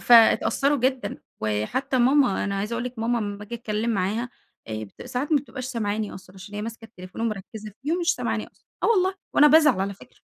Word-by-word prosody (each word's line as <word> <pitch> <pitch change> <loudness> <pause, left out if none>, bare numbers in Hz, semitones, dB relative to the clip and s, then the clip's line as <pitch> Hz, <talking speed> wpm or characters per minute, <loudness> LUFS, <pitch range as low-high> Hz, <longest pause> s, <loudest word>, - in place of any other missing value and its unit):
فاتأثّروا 240 +4 +5
جدًا. 255 -4 -1 0.2
وحتى 110 - -1
ماما، 255 -3 +4
أنا 200 -1 -2
عايزة 210 +3 -3
أقول 240 +1 -2
لِك 250 -1 -6
ماما 235 +2 +1
أمّاآجي 205 +1 -5
أتكلم 225 0 -2
معاها، 215 +4 0 0.8
ساعات 275 +5 -2
ما 300 - +6
بتبقاش 260 -2 -7
سامعاني 220 -4 -2
أصلًا 185 0 -13
عشان 190 +2 -11
هي 210 - -3
ماسكة 225 +1 -7
التليفون 185 -3 -10
ومركّزة 215 -1 -4
فيه 300 +4 0
مش 340 0 +2
سامعاني 230 -3 -2
أصلًا - - -26 0.2
آه - - +3
والله 380 -4 +3 0.2
وأنا 295 - +7
بازعل 300 -9 +6
على 200 +1 -1
فكرة. 195 - -18
230 Hz, 185 wpm, -25 LUFS, 205-260 Hz, 0.8 s, وأنا